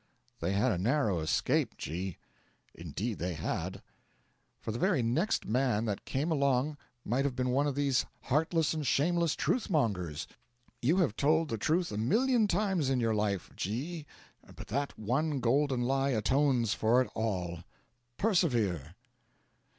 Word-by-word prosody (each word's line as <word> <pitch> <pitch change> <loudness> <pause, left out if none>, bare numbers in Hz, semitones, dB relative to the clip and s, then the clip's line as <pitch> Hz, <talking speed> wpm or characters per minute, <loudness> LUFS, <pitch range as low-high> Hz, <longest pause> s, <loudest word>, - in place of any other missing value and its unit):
'They 85 +3 -1
had 105 +6 +2
a 90 - -1
narrow 110 - +1
escape, 80 0 0
G 90 +3 -4 0.3
.' - - -38
'Indeed 90 +7 -4
they 90 0 -2
had.' 75 - -4 0.8
'For - - -4
the 115 - -4
very 125 - +2
next 160 - 0
man 120 -1 +1
that 105 -3 -3
came 145 +5 -1
along 140 0 +1 0.3
might 130 +3 +1
have 140 -3 -1
been 125 0 0
one 140 +3 +2
of 140 - -2
these 140 -2 +1 0.2
heartless 160 +3 +1
and 155 -3 -3
shameless 170 +4 +2
truth 245 - 0
mongers. 90 - 0 0.6
You 155 +9 +3
have 160 - +2
told 155 +4 +2
the 115 - -2
truth 165 - +1
a 105 - -4
million 225 - +3
times 190 -7 +1
in 130 -2 +1
your 115 -2 +1
life, 105 -3 -1
G, 145 - -4 0.5
but - - -10
that 140 +5 -2
one 135 +7 0
golden 130 +1 +2
lie 135 +2 +1
atones 125 -1 +2
for 115 +3 +3
it - - -10
all. 90 -6 -2 0.6
Persevere.' 115 - +1
130 Hz, 155 wpm, -31 LUFS, 105-150 Hz, 0.8 s, You